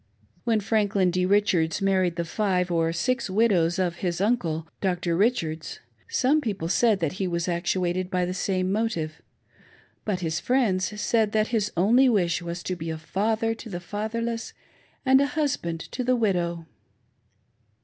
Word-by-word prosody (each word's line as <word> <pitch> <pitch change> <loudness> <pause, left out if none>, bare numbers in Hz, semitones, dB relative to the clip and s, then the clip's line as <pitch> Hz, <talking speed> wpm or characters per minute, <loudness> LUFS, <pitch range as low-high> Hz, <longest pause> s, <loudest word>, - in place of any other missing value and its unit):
When 225 -2 +2
Franklin 200 -3 +1
D. 180 +1 +1
Richards 190 -5 +2
married 190 -3 +1
the 170 0 -2
five 180 0 0
or 165 -1 +1
six 255 +8 -1
widows 185 -5 +3
6f 180 -3 -1
his 175 -2 -2
uncle,* 170 -7 0
Dr. 180 -3 0
Richards, 165 -6 0 0.3
some 290 +4 +2
people 195 - -3
said 220 +1 +3
that 160 -3 0
he 190 - +1
was 170 -1 -2
act 175 0 -2
uated 185 0 0
by 180 -2 0
the 180 - -3
same 185 0 -1
motive; 200 -8 -2 0.8
but 195 -4 -2
his 160 -2 -1
friends 210 -6 0
said 220 -1 +1
that 215 0 +2
his 220 -4 0
only 240 +9 +5
wis'h 175 -7 +1
was 170 0 -5
to 185 - -2
be 165 -1 -6
a 160 - -3
father 220 +7 0
to 225 0 -10
the 175 -3 -4
fatherless 225 +5 -4 0.5
and 265 +1 +6
a 280 - +2
husband 170 - -1
to 250 - -3
the 255 +1 +2
widow! 175 -7 0
190 Hz, 165 wpm, -25 LUFS, 170-220 Hz, 0.8 s, and